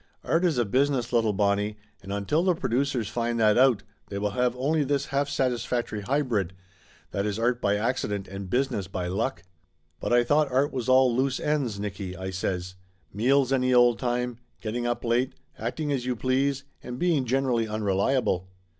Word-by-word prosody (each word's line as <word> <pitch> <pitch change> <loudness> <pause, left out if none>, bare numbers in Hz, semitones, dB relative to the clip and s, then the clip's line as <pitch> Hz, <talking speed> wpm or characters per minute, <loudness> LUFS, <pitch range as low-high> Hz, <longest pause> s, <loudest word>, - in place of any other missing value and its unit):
Art 165 +2 +1
is 165 -7 +2
a 120 - +2
business, 130 +1 +1
little 115 -2 +3
Bonnie, 105 +1 0 0.2
and 100 - -8
until 100 +11 0
the 180 -2 +3
producers 130 - 0
find 115 +2 -1
that 105 -2 +5
out 125 -4 +4 0.2
they 100 - -5
will 105 +1 -1
have 125 +3 +1
only 150 +4 +1
this 140 0 0
half 140 +1 +1
satisfactory 120 -4 -1
hybrid, 115 - 0 0.6
that 100 +1 -1
is 105 -1 -2
art 120 +2 +1
by 100 0 +2
accident 105 -3 -1
and 95 -1 -7
business 120 -5 0
by 90 -1 -4
luck!" 110 +9 -2 0.6
"But - - -3
I 120 0 +5
thought 145 +3 +2
art 135 +4 +2
was 130 -1 -2
all 130 -2 +5
loose 135 +1 +1
ends, 140 -9 -1
Nicky," 100 -2 -5
I 95 +1 -4
says. 90 -1 -3 0.4
"Meals 130 +5 +3
any 130 -1 +2
old 120 -1 +5
time, 125 -1 -1 0.2
getting 120 +2 -3
up 120 0 -2
late, 120 +3 +1 0.3
acting 155 -2 -2
as 135 -3 0
you 125 0 -1
please, 135 +3 0 0.2
and 125 0 -6
being 165 -3 +2
generally 125 -2 +1
unreliable." 100 -2 0
120 Hz, 180 wpm, -26 LUFS, 105-135 Hz, 0.6 s, that